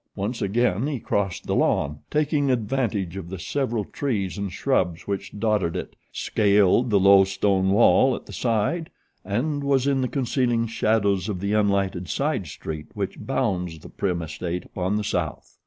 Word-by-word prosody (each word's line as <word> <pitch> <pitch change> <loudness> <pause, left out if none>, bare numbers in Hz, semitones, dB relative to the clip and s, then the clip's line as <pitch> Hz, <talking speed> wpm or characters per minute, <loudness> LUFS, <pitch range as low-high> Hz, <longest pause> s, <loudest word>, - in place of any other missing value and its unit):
Once 110 +5 -3
again 115 +3 +1
he 145 -4 -2
crossed 100 -4 -2
the - - -1
lawn, 75 +1 +1
taking 150 -2 +1
advantage 110 -7 -1
of 90 -3 -7
the 95 - -5
several 115 +2 -2
trees 105 -10 -2
and 100 -2 -4
shrubs 90 -9 0
which 100 +1 -4
dotted 105 -6 +1
it, 90 - -5 0.2
scaled 105 +3 +3
the 105 -2 +4
low 100 0 +7
stone 95 0 +1
wall 120 +5 +5
at - - -9
the - - -11
side 125 +9 0 0.3
and 140 +9 -1
was 135 -2 +2
in 140 -1 +2
the 130 - +1
concealing 120 -3 0
shadows 105 -3 +1
of 95 -4 -3
the 100 +2 -1
unlighted 100 -4 +1
side 140 - -1
street 75 +2 -6
which 100 -2 -4
bounds 90 -11 -1
the - - -12
Prim 90 -3 -2
estate 85 +3 -4
upon 95 +1 -2
the 105 - 0
south. 85 -6 -3
100 Hz, 170 wpm, -24 LUFS, 95-125 Hz, 0.3 s, low